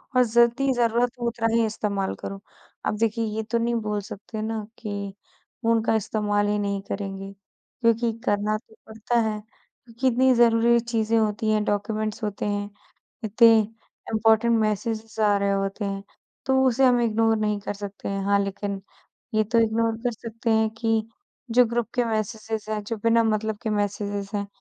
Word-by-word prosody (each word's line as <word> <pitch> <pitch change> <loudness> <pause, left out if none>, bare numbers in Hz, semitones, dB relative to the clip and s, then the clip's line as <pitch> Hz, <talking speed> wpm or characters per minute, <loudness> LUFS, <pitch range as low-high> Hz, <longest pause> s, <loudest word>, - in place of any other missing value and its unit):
और 250 - +6
जितनी 235 +4 +3
ज़रूरत 240 0 +2
हो 240 - -1
उतना 230 -1 0
ही 230 -1 +3
इस्तेमाल 205 -3 -2
करूँ। 195 - -7 0.5
अब 210 - 0
देखिए, 225 +1 0
ये 220 0 -3
तो 225 +2 -1
नहीं 235 +1 0
बोल 210 -2 -1
सकते 205 +2 -7
ना, 220 -1 -3
कि 200 -2 -5 0.5
उनका 225 -1 +2
इस्तेमाल 205 -1 0
ही 210 0 +1
नहीं 200 -1 -1
करेंगे। 195 -1 -4 0.5
क्योंकि 230 0 +3
करना 210 0 +1
तो 220 0 -20
पड़ता 220 +2 -1
है 215 - -3
अ, 220 +2 -23
कितनी 260 0 +4
ज़रूरी 235 0 +5
चीज़ें 230 -1 0
होती 215 0 +1
हैं, 215 -1 +2
डॉक्यूमेंट्स 215 +1 -2
होते 210 -1 -3
हैं। 205 0 -2 0.5
इतने 225 +1 +6 0.5
इम्पॉर्टेंट 225 +1 +4
मैसेजेज़ 220 +1 -2
आ 205 -1 +4
रहे 200 0 +1
होते 195 +1 -1
हैं, 195 0 -3 0.4
तो 265 0 +3
उसे 260 +2 +3
हम 245 -1 +4
इग्नोर 225 -1 +2
नहीं 210 -1 0
कर 205 - -4
सकते 200 0 -7
हैं। 195 0 -2
हाँ, 200 0 +3
लेकिन 195 0 -4 0.5
ये 215 - +3
तो 230 +3 +1
इग्नोर 225 0 +1
कर 245 - +1
सकते 230 +1 -4
हैं, 220 0 +3
कि 225 -1 -1 0.4
जो 250 +2 +6
ग्रुप 235 0 -1
के 245 - +2
मैसेजेज़ 220 0 -3
हैं, 210 -1 -2
जो 230 +2 -3
बिना 230 0 +5
मतलब 215 -1 0
के 220 - -1
मैसेजेज़ 205 -1 -2
हैं, 200 0 -2
220 Hz, 175 wpm, -25 LUFS, 205-230 Hz, 0.5 s, और